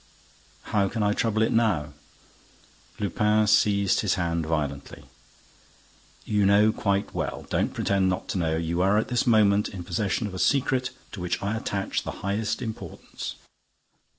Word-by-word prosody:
"How 100 Hz, -2 st, +3 dB
can 110 Hz, 0 st, -2 dB
I 105 Hz, 0 st, +2 dB
trouble 110 Hz, 0 st, +1 dB
it 110 Hz, -, +1 dB
now?" 95 Hz, -11 st, +1 dB, 1.1 s
Lupin 105 Hz, +2 st, +2 dB
seized 100 Hz, -2 st, +3 dB
his -, -, +1 dB
hand 85 Hz, -3 st, -1 dB
violently: 70 Hz, -3 st, -3 dB, 1.2 s
"You 105 Hz, -1 st, +1 dB
know 100 Hz, +2 st, +5 dB
quite 100 Hz, -2 st, -1 dB
well! -, -, -4 dB
Don't -, -, +1 dB
pretend 95 Hz, -1 st, +1 dB
not 90 Hz, -, -2 dB
to 95 Hz, -, -1 dB
know. 80 Hz, -2 st, 0 dB
You 85 Hz, +2 st, -1 dB
are 100 Hz, +3 st, +3 dB
at 110 Hz, -, 0 dB
this 125 Hz, -1 st, 0 dB
moment 105 Hz, -3 st, +4 dB
in 95 Hz, -3 st, -7 dB
possession 95 Hz, +5 st, -1 dB
of 100 Hz, -, -5 dB
a 95 Hz, -, -5 dB
secret 130 Hz, 0 st, +1 dB, 0.2 s
to 105 Hz, -, -8 dB
which 90 Hz, -1 st, -1 dB
I 100 Hz, +2 st, -1 dB
attach 100 Hz, -3 st, -2 dB
the -, -, -6 dB, 0.2 s
highest 105 Hz, +5 st, -1 dB
importance. 110 Hz, -2 st, -7 dB
100 Hz, 155 wpm, -26 LUFS, 90-110 Hz, 1.2 s, know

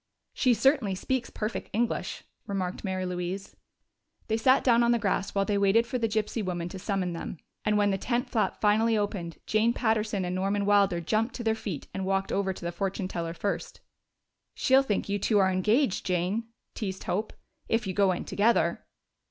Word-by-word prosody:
"She 250 Hz, -3 st, +3 dB
certainly 265 Hz, -7 st, +2 dB
speaks 250 Hz, +5 st, -2 dB
perfect 215 Hz, +1 st, -4 dB
English," 235 Hz, +3 st, -1 dB, 0.2 s
remarked 190 Hz, -3 st, -3 dB
Mary 185 Hz, -2 st, -2 dB
Louise. 180 Hz, +2 st, -4 dB, 0.7 s
They 220 Hz, -, +2 dB
sat 260 Hz, +4 st, +4 dB
down 235 Hz, -2 st, +5 dB
on 235 Hz, 0 st, +4 dB
the 240 Hz, -, +4 dB
grass 200 Hz, -2 st, -1 dB
while 195 Hz, 0 st, +2 dB
they 200 Hz, 0 st, +1 dB
waited 200 Hz, +4 st, +4 dB
for 250 Hz, +1 st, -3 dB
the 230 Hz, -, +1 dB
gypsy 215 Hz, +1 st, -1 dB
woman 175 Hz, -2 st, -3 dB
to 190 Hz, -, -7 dB
summon 185 Hz, -3 st, -1 dB
them, 165 Hz, -, -6 dB, 0.3 s
and 210 Hz, 0 st, +2 dB
when 205 Hz, -1 st, +3 dB
the 195 Hz, -, -1 dB
tent 245 Hz, +4 st, -1 dB
flap 225 Hz, -3 st, 0 dB
finally 220 Hz, +2 st, +3 dB
opened, 200 Hz, -5 st, -3 dB
Jane 220 Hz, +2 st, +2 dB
Patterson 215 Hz, -5 st, 0 dB
and 180 Hz, -, -2 dB
Norman 195 Hz, +2 st, 0 dB
Wilder 200 Hz, -4 st, +3 dB
jumped 220 Hz, +8 st, 0 dB
to 240 Hz, -, -5 dB
their 220 Hz, -1 st, +2 dB
feet 205 Hz, -9 st, -5 dB
and 195 Hz, -, -3 dB
walked 195 Hz, 0 st, 0 dB
over 195 Hz, -1 st, 0 dB
to 180 Hz, -, -8 dB
the 170 Hz, -, -1 dB
fortune 190 Hz, +2 st, -2 dB
teller 170 Hz, -2 st, -4 dB
first. 200 Hz, +4 st, -3 dB, 0.7 s
"She'll 265 Hz, +1 st, +4 dB
think 215 Hz, -7 st, -1 dB
you 205 Hz, 0 st, -1 dB
two 210 Hz, +2 st, +2 dB
are 190 Hz, -1 st, +4 dB
engaged, 210 Hz, +5 st, +2 dB
Jane," 185 Hz, +5 st, 0 dB, 0.3 s
teased 190 Hz, -3 st, -4 dB
Hope, 200 Hz, +5 st, -2 dB, 0.4 s
"if 225 Hz, -1 st, +1 dB
you 190 Hz, -, -2 dB
go 200 Hz, -1 st, +3 dB
in 175 Hz, -, -3 dB
together." 225 Hz, +3 st, +2 dB
205 Hz, 195 wpm, -28 LUFS, 185-225 Hz, 0.7 s, down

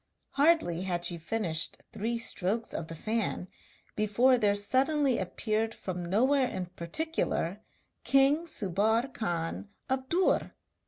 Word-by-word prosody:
Hardly 280 Hz, -, +3 dB
had 175 Hz, -2 st, 0 dB
she 170 Hz, -1 st, +2 dB
finished 165 Hz, -3 st, -1 dB, 0.2 s
three 230 Hz, +3 st, -2 dB
strokes 225 Hz, -1 st, -1 dB
of 165 Hz, -, -4 dB
the 165 Hz, -, -7 dB
fan 215 Hz, 0 st, -2 dB, 0.5 s
before 215 Hz, +5 st, +3 dB
there 210 Hz, -4 st, +2 dB
suddenly 265 Hz, +6 st, +2 dB
appeared 215 Hz, +4 st, -2 dB
from 180 Hz, -2 st, -5 dB
nowhere 260 Hz, +7 st, +3 dB
in 185 Hz, -6 st, -4 dB
particular, 185 Hz, -, -2 dB, 0.4 s
king 280 Hz, +5 st, +3 dB
Subbar 220 Hz, -, +1 dB
Khan 175 Hz, 0 st, -3 dB, 0.2 s
of 265 Hz, 0 st, -1 dB
Dûr! 360 Hz, +2 st, +1 dB
215 Hz, 120 wpm, -29 LUFS, 180-260 Hz, 0.5 s, Hardly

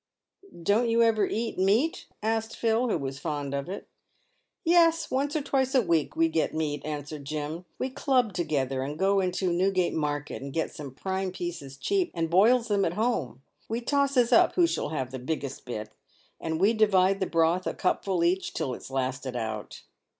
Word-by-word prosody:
" 385 Hz, -, -16 dB
Don't 220 Hz, +7 st, +3 dB
you 230 Hz, 0 st, +4 dB
ever 220 Hz, -2 st, +3 dB
eat 225 Hz, -3 st, -3 dB
meat 215 Hz, -, +2 dB
?" -, -, -46 dB
asked 225 Hz, 0 st, -1 dB
Phil, 230 Hz, +2 st, +1 dB
who 210 Hz, -, +1 dB
was 135 Hz, -2 st, -5 dB
fond 145 Hz, -2 st, -3 dB
of 140 Hz, +4 st, -3 dB
it. 195 Hz, -, -6 dB, 0.4 s
" -, -, -44 dB, 0.3 s
Yes, 330 Hz, -1 st, +4 dB
once 280 Hz, +4 st, 0 dB
or 305 Hz, -, 0 dB
twice 265 Hz, -1 st, 0 dB
a 260 Hz, -, +6 dB
week 165 Hz, -5 st, +1 dB
we 165 Hz, -, +4 dB
get 160 Hz, -1 st, 0 dB
meat," 150 Hz, -3 st, -2 dB
answered 150 Hz, -1 st, -5 dB
Jim. 155 Hz, +4 st, -4 dB
" -, -, -41 dB
We 260 Hz, -, -2 dB
club 255 Hz, -5 st, +1 dB
together 135 Hz, -7 st, -1 dB
and 145 Hz, +3 st, -4 dB
go 195 Hz, +2 st, +3 dB
into 185 Hz, -1 st, 0 dB
Newgate 185 Hz, 0 st, +1 dB
market 145 Hz, -2 st, -2 dB
and 140 Hz, +1 st, -6 dB
get 160 Hz, +3 st, -2 dB
some 145 Hz, -3 st, -7 dB
prime 190 Hz, +3 st, -2 dB
pieces 170 Hz, -7 st, -6 dB
cheap, 385 Hz, -, 0 dB
and 165 Hz, -1 st, -1 dB
boils 230 Hz, +7 st, +5 dB
them 205 Hz, -2 st, +2 dB
at 165 Hz, -, 0 dB
home. 165 Hz, -, -1 dB, 0.3 s
We 225 Hz, +2 st, -1 dB
tosses 265 Hz, -1 st, +2 dB
up -, -, +5 dB
who 355 Hz, -, +5 dB
shall 335 Hz, -, -1 dB
have 130 Hz, -5 st, -3 dB
the 130 Hz, -, -5 dB
biggest 135 Hz, 0 st, -4 dB
bit, 110 Hz, -3 st, -5 dB, 0.5 s
and 160 Hz, 0 st, -2 dB
we 200 Hz, +5 st, +4 dB
divide 195 Hz, -3 st, +3 dB
the 190 Hz, -, 0 dB
broth, 165 Hz, +2 st, +2 dB
a -, -, -1 dB
cupful 185 Hz, -1 st, 0 dB
each, 180 Hz, +3 st, +1 dB
until 140 Hz, -6 st, -3 dB
it's -, -, -9 dB
lasted 130 Hz, -1 st, -2 dB
out." 110 Hz, -3 st, -5 dB
180 Hz, 200 wpm, -27 LUFS, 145-225 Hz, 0.5 s, a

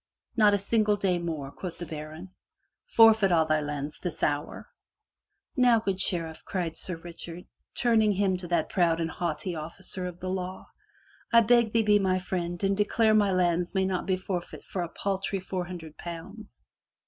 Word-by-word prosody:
'* -, -, -59 dB
"Not 210 Hz, -3 st, +5 dB
a -, -, +2 dB
single 210 Hz, +1 st, +2 dB
day 190 Hz, -3 st, 0 dB
more,*' 155 Hz, -5 st, -4 dB
quoth 180 Hz, +1 st, -7 dB
the 175 Hz, -, -6 dB
baron. 155 Hz, +3 st, -8 dB, 0.6 s
"Forfeit 220 Hz, -3 st, +6 dB
be -, -, +2 dB
all 160 Hz, -1 st, +4 dB
thy 155 Hz, -1 st, +1 dB
lands, 145 Hz, 0 st, -4 dB
this 180 Hz, -3 st, -5 dB
hour." 145 Hz, 0 st, -1 dB, 0.9 s
"Now, 245 Hz, -4 st, +5 dB
good 195 Hz, -3 st, -2 dB
Sheriff, 165 Hz, -4 st, -1 dB
cried 170 Hz, -4 st, -3 dB
Sir 180 Hz, -, -3 dB
Richard, 170 Hz, +1 st, -9 dB, 0.3 s
turning 220 Hz, -3 st, +3 dB
him 195 Hz, -1 st, +1 dB
to 180 Hz, -1 st, -7 dB
that 170 Hz, -2 st, +1 dB
proud 170 Hz, -4 st, +2 dB
and 165 Hz, -1 st, -1 dB
haughty 175 Hz, +1 st, -3 dB
officer 180 Hz, +3 st, -6 dB
of 175 Hz, -1 st, -8 dB
the 185 Hz, -, -5 dB
law. 185 Hz, 0 st, -4 dB, 0.3 s
" -, -, -31 dB
I 235 Hz, -1 st, +7 dB
beg 235 Hz, 0 st, +4 dB
thee 225 Hz, 0 st, +3 dB
be 210 Hz, -1 st, +4 dB
my 185 Hz, -1 st, +2 dB
friend 175 Hz, -1 st, -3 dB
and 195 Hz, 0 st, +2 dB
declare 215 Hz, +2 st, +3 dB
my 205 Hz, -2 st, +4 dB
lands 175 Hz, 0 st, +1 dB
may 190 Hz, 0 st, +2 dB
not 190 Hz, -1 st, -2 dB
be 185 Hz, -1 st, +2 dB
forfeit 185 Hz, -2 st, -5 dB
for 185 Hz, -, -4 dB
a 170 Hz, -, -3 dB
paltry 195 Hz, +2 st, -2 dB
four 185 Hz, -1 st, -4 dB
hun 180 Hz, 0 st, -6 dB
dred 160 Hz, -2 st, -12 dB
pounds. 175 Hz, +6 st, -9 dB
185 Hz, 195 wpm, -28 LUFS, 170-200 Hz, 0.9 s, I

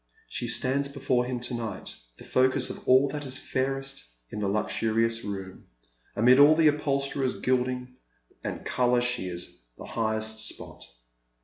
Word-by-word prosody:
She -, -, -4 dB
stands 140 Hz, +2 st, 0 dB
before 130 Hz, -3 st, 0 dB
him 125 Hz, -1 st, -3 dB
to 125 Hz, -, -5 dB
night 110 Hz, -5 st, -5 dB, 0.2 s
tho -, -, -12 dB
focus 130 Hz, 0 st, +2 dB
of -, -, -11 dB
all 130 Hz, +2 st, +6 dB
that 150 Hz, 0 st, -4 dB
is 130 Hz, -2 st, -4 dB
fairest 135 Hz, -, -3 dB, 0.3 s
in -, -, -5 dB
the 105 Hz, -, 0 dB
luxurious 115 Hz, +2 st, 0 dB
room: 95 Hz, -2 st, -6 dB, 0.5 s
amid 125 Hz, +5 st, +6 dB
all 145 Hz, +2 st, +8 dB
the 160 Hz, -1 st, +5 dB
upholsterer's 140 Hz, -2 st, -1 dB
gilding 125 Hz, 0 st, -1 dB, 0.5 s
and -, -, -5 dB
colour 125 Hz, -1 st, +2 dB
she 120 Hz, -5 st, -1 dB
is 90 Hz, -1 st, -5 dB, 0.2 s
the -, -, -9 dB
brightest 110 Hz, -1 st, -2 dB
spot. -, -, -10 dB
125 Hz, 150 wpm, -27 LUFS, 110-135 Hz, 0.5 s, all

